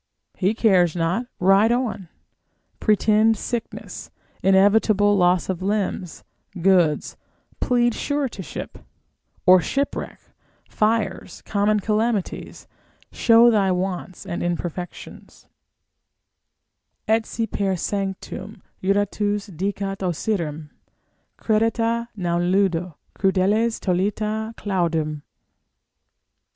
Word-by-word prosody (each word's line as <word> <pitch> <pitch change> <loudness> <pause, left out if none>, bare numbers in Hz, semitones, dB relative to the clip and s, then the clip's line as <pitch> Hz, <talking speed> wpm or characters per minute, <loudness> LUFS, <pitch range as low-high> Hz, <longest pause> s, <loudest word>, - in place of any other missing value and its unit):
he 195 +3 0
cares 185 -8 +3
not, 175 +8 -1
ride 195 +4 +4
on: 230 -8 -2 0.7
pretend 215 +1 +3
sickness, 235 +2 -6 0.3
inevitable 205 +1 +4
loss 180 -2 +2
of 185 -2 -3
limbs, 195 -3 -2 0.4
goods, 175 -5 +2 0.4
plead 240 -1 +2
suretyship, 270 - -4 0.7
or 185 0 +7
shipwreck, 280 - -3 0.5
fires, 220 0 -1
common 210 +1 +1
calamities, 215 0 -2 0.4
show 235 0 +5
thy 200 -3 +2
wants 185 0 -3
and 170 - -4
imperfections, 175 0 -6 1.6
Et 220 +1 +3
si 225 - -2
per 195 -3 -1
sanctum 195 +2 -5 0.2
juratus 205 +1 0
dicat 195 +2 -3
Osyrim, 165 -4 -2 0.7
Credite, 230 +1 0
non 175 -3 -1
ludo, 180 -4 +1 0.2
crudeles 205 +4 +1
tollite 215 +4 -1
claudum. 165 -6 -1
200 Hz, 85 wpm, -22 LUFS, 180-220 Hz, 1.6 s, or